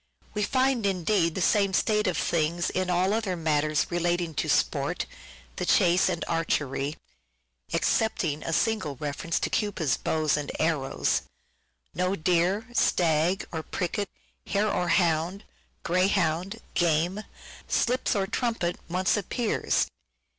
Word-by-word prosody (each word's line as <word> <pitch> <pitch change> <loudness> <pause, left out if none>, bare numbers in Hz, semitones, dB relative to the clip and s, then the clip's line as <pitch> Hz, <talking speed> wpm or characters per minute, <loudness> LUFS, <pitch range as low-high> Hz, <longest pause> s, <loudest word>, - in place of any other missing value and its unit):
We 210 - -2
find 255 +2 +1
indeed 180 -2 +1
the 190 - -2
same 200 -1 +3
state 210 +1 +2
of 185 - 0
things 170 +1 0
in 185 -1 -1
all 180 +3 +2
other 215 -5 -1
matters 155 -2 +1
relating 175 -1 0
to - - -2
sport, - - +1 0.5
the - - -2
chase 180 +2 +4
and 175 -2 -2
archery 150 -3 -1 0.7
(excepting 165 -9 0
a - - -4
single 215 -5 0
reference 150 +4 -2
to - - -1
Cupid's 175 - 0
bow 155 -1 -1
and 145 -1 -3
arrows). 155 -4 0 0.7
No 180 +4 0
deer, 180 +5 +1
stag 170 -3 +2
or 160 - -3
pricket, 195 +4 -3 0.4
hare 205 +1 +1
or 180 0 0
hound, 175 +2 +1 0.4
greyhound, 185 +2 +1
game, 175 +4 +1 0.5
slips 250 0 +1
or 195 -1 +1
trumpet, 225 -5 -1
once 185 +2 +1
appears. 215 +3 0
180 Hz, 125 wpm, -27 LUFS, 160-200 Hz, 0.7 s, chase